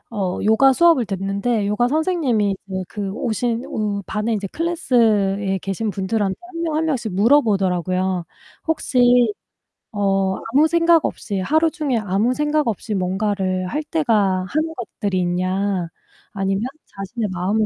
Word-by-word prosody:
어 190 -3 -1
요가 220 +6 +5
수업을 330 -4 +4
듣는데 200 +3 -1
요가 210 +4 +1
선생님이 275 - +1
이제 190 -1 -3
그 200 0 -4
오신 235 +1 -2
오 205 -2 -3
반에 215 +2 -2
이제 205 -2 -2
클래스에 215 - +1
계신 195 +4 -3
분들한테 195 0 -1
1 350 -1 -8
명 320 -2 -1
1 320 +1 +1
명씩 240 - -2
물어보더라고요. 190 - +2 0.4
혹시 245 -7 +3 0.6
"어, 195 -2 +1 0.2
아무 295 +4 +5
생각 335 0 +3
없이 205 -2 -3
하루 315 - +2
종일 285 -8 -1
아무 205 +7 +1
생각 300 -1 0
없이 220 0 -3
뭔가를 190 -1 -1
할 295 +11 -2
때가 210 - +1
하는 315 - -1
것들이 205 -5 -3
있냐? 185 +1 -1 0.5
아니면 195 0 -1 0.2
자신의 205 +3 -5
마음을 185 +4 0
210 Hz, 290 characters per minute, -21 LUFS, 195-265 Hz, 0.6 s, 요가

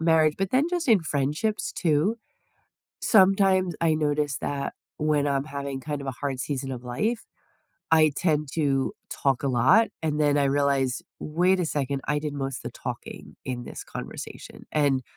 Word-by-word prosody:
marriage, 160 -2 +4
but 195 -1 -1
then 260 +3 +3
just 350 -4 -2
in 220 -5 +6
friendships, 150 +8 -1
too. 165 +7 +1 0.8
Sometimes 190 -3 +4
I 165 -1 +3
notice 150 -2 0
that 140 -1 -3 0.3
when 150 -1 +2
I'm 140 -1 0
having 140 -2 -5
kind 145 +1 -4
of 140 - -7
a - - 0
hard 135 0 -3
season 135 0 -3
of 125 - -6
life, 215 - -1 0.7
I 155 -1 +6
tend 150 -4 +1
to 140 -4 +1 0.2
talk 135 -2 0
a 140 - +1
lot, 130 - +5
and 155 -1 0
then 145 -1 +3
I 140 - +3
realize, 140 -2 +1 0.2
"Wait 180 +5 +2
a 170 - 0
second, 140 -2 -2
I 150 0 +2
did 150 -1 -4
most 135 -3 -3
of - - -12
the - - -4
talking - - -7
in 125 -2 -4
this - - -7
conversation," - - -8
and 140 -4 +2
150 Hz, 175 wpm, -26 LUFS, 135-165 Hz, 0.8 s, in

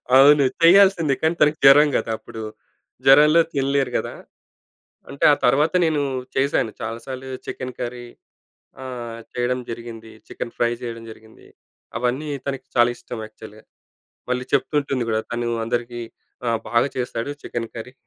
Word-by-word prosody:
అవును 140 +2 +7 0.2
చేయాల్సింది. 175 -4 +6
కానీ 160 +2 +1
తనకి 150 +1 +4
జ్వరం 145 +2 +8
కదా 115 - -3
అప్పుడు. 115 0 -10 0.6
జ్వరంలో 150 +4 +7
తినలేరు 135 -1 0
కదా. - - -4 1.0
అంటే 140 - -1
ఆ - - +3
తర్వాత 145 +7 +3
నేను 155 -2 +1 0.3
చేశాను 135 -5 +1
చాలాసార్లు 125 +4 -6 0.2
చికెన్ 130 -1 -6
కర్రీ 120 0 -5 0.8
ఆహ్, 120 -3 -7 0.2
చేయడం 125 +1 0
జరిగింది. 115 -1 -8 0.2
చికెన్ 115 - -6
ఫ్రై 120 0 +1
చేయడం 115 -1 -6
జరిగింది. 110 0 -16 0.5
అవన్నీ 125 +5 -2 0.2
తనకి 135 -1 -4
చాలా 120 0 +5
ఇష్టం 120 -1 -8
యాక్చువల్‌గా. 110 0 -14 0.7
మళ్ళీ 125 0 -1
చెప్తూంటుంది 140 -2 0
కూడా 110 0 +1
తను 120 0 -2 0.2
అందరికీ 120 0 -3 0.5
ఆ! - - +2 0.2
"బాగా 120 +4 +3
చేస్తాడు 125 0 -3
చికెన్ 115 -1 -4
కర్రీ" 120 +2 -8
125 Hz, 135 wpm, -22 LUFS, 115-140 Hz, 1.0 s, జ్వరం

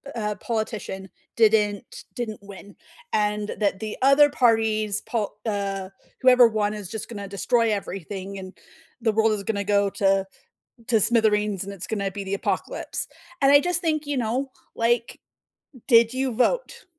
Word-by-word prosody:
u 230 - -3
uh, 210 0 -2
politician 215 -3 -4 0.3
didn't 215 -1 +2
didn't 220 -4 -5
win 200 0 -12 0.4
and 210 0 0
that 200 -2 +1
the 215 -1 -5
other 275 +2 +6
parties 220 -5 +2
pol 215 -3 -2
uh, 200 -3 -2 0.3
whoever 250 -2 +7
won 215 -2 -1
is 205 -4 -7
just 220 -2 -5
gonna 205 -4 -6
destroy 225 +3 +1
everything, 195 0 -5
and 185 0 -10 0.4
the 225 -1 +2
world 220 +1 +3
is 205 -2 -3
gonna 200 0 -2
go 200 0 +2
to 195 0 +1 0.6
to 230 -3 +3
smithereens, 210 -3 +2
and 200 - -7
it's 190 -2 -7
gonna 200 -3 -2
be 200 +1 -6
the 195 0 -4
apocalypse. - - -3 0.3
And 275 0 +5
I 285 - +8
just 350 +2 -1
think, 310 -3 0
you 290 -1 -1
know, 250 +3 -1 0.3
like, 235 0 0 0.7
"Did 230 -1 +6
you 260 0 -1
vote? 475 - 0
215 Hz, 160 wpm, -24 LUFS, 200-235 Hz, 0.7 s, I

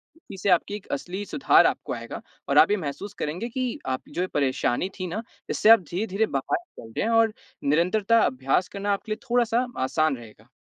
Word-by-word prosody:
तो - - -22 0.2
इससे 190 +1 -1
आपकी 180 +3 +2
एक 210 - -10
असली 180 +8 -3
सुधार 280 - +4
आपको - - -3
आएगा - - -7 0.3
और - - +2
आप - - +7
ये 210 - +3
महसूस 185 +5 -5
करेंगे 180 +11 -3
कि 255 +2 -3
आपकी 130 0 -4
जो 180 - -1
ये 185 - 0
परेशानी 135 +3 0
थी 185 - -2
ना, 195 +6 -3 0.3
इससे 215 - +3
आप 225 - +10
धीरे-धीरे 200 +3 0
बाहर 135 -9 -1
निकल 230 - -14
रहे - - +1
हैं 230 - 0
और 225 -1 +3 0.3
निरंतरता 195 +10 +3
अभ्यास 135 +7 +1
करना 200 0 -1
आपके 215 +2 -5
लिए 215 - -2
थोड़ा-सा 240 0 +2 0.2
आसान 140 +1 +1
रहेगा। 110 -1 -14
190 Hz, 205 wpm, -25 LUFS, 145-220 Hz, 0.3 s, आप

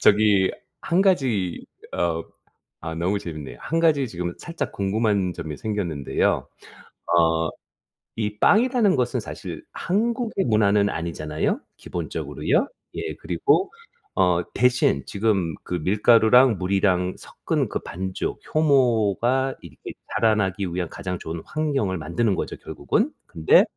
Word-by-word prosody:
저기 105 -2 +4 0.3
1 170 +3 +1
가지 125 - +1 0.3
어 85 -1 0 0.6
아 80 0 -4
너무 95 +5 0
재밌네요. 75 -8 -7
1 165 - -1
가지 150 -6 +3
지금 85 -3 -4
살짝 170 -1 -5
궁금한 100 -2 0
점이 75 -3 -6
생겼는데요. 90 -10 -1 0.7
어 80 -1 +2 0.7
이 105 -1 -2
빵이라는 230 - +4
것은 125 -1 0
사실 - - -7
한국의 225 +1 -1
문화는 105 -2 +3
아니잖아요, 85 - -2 0.2
기본적으로요. - - -1 0.3
예, 420 - -3
그리고 390 - +1 0.5
어 90 -2 +3
대신 125 - +2
지금 100 -6 0
그 90 - -5
밀가루랑 110 +6 +5
물이랑 90 -1 +1
섞은 - - -2
그 - - -2
반죽, 95 +2 -4
효모가 130 -3 +2
이렇게 - - -10 0.2
자라나기 105 -3 +2
위한 90 -2 -2
가장 90 +1 -5
좋은 80 0 -5
환경을 140 -11 -1
만드는 95 +6 0
거죠, - - -4
결국은. - - -1
근데 80 -1 +5
100 Hz, 270 characters per minute, -24 LUFS, 90-130 Hz, 0.7 s, 밀가루랑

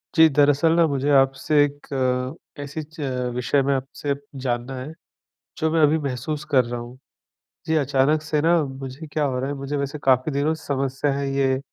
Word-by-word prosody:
जी। 160 -1 +8
दरअसल 145 +2 +4
ना 170 - +5
मुझे 140 -1 -1
आपसे 135 +2 +3
एक 145 0 -5
अ, 130 +2 -2
ऐसी 145 +2 -5
च 155 +3 -17 0.4
विषय 125 +3 +1
में 140 - +1
आपसे 135 +2 -3 0.3
जानना 120 +1 -2
है, 130 +5 -7 0.7
जो 160 -1 +1
मैं 165 0 +2
अभी 150 +1 +4
महसूस 145 +1 -3
कर 130 -4 +4
रहा 120 0 -5
हूँ। 120 +2 -10 0.7
जी, 160 - +1
अचानक 145 +1 +2
से 155 -1 -1
ना 165 +1 +4
मुझे 135 +2 -7
क्या 150 - 0
हो 130 -2 -1
रहा 135 +2 -2
है 145 - -3
मुझे 140 +1 -4
वैसे 140 +1 -3
काफ़ी 130 +3 +3
दिनों 145 +3 +1
से 160 -1 -9
समस्या 135 0 -1
हैं 140 0 -2
ये, 135 -1 +1
140 Hz, 195 wpm, -23 LUFS, 130-150 Hz, 0.7 s, जी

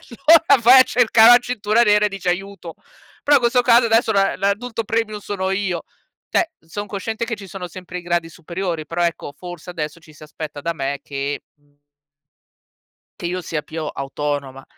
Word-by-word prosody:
e 235 - -14
allora 315 -6 +6
vai 255 +3 +8
a - - +10
cercare 230 -2 +4
la 245 - +10
cintura 235 -2 0
nera 210 -1 +4
e - - 0
dice: 195 -2 -5
"Aiuto". 190 -2 -5 0.5
Però 290 -1 +5
questo 245 0 +2
caso, 240 0 +5
adesso, 225 0 +2
la 195 -1 +2
l'adulto 220 +4 -1
premium 220 -1 -2
sono 190 -2 -3
io! 190 -3 -2 0.5
Cioè, 335 - +1
son 205 +6 -7
cosciente 220 +3 -4
che 230 - -3
ci 200 -2 -11
sono 180 -1 -7
sempre 180 +1 -8
i - - -9
gradi 170 -1 -1
superiori, 170 -1 -5
però, 170 +3 -2
ecco, 165 -4 -3
forse 175 0 -9
adesso 155 -1 -5
ci 155 -1 -18
si 150 - -17
aspetta 150 -1 -8
da 170 +3 -2
me 140 -1 -3
che, 140 0 -4
mhmm 145 0 -35 1.4
che 170 - -3
io 180 +1 -3
sia 155 -1 -3
più 160 -1 -6
autonoma. 140 -1 -4
185 Hz, 185 wpm, -20 LUFS, 160-225 Hz, 1.4 s, a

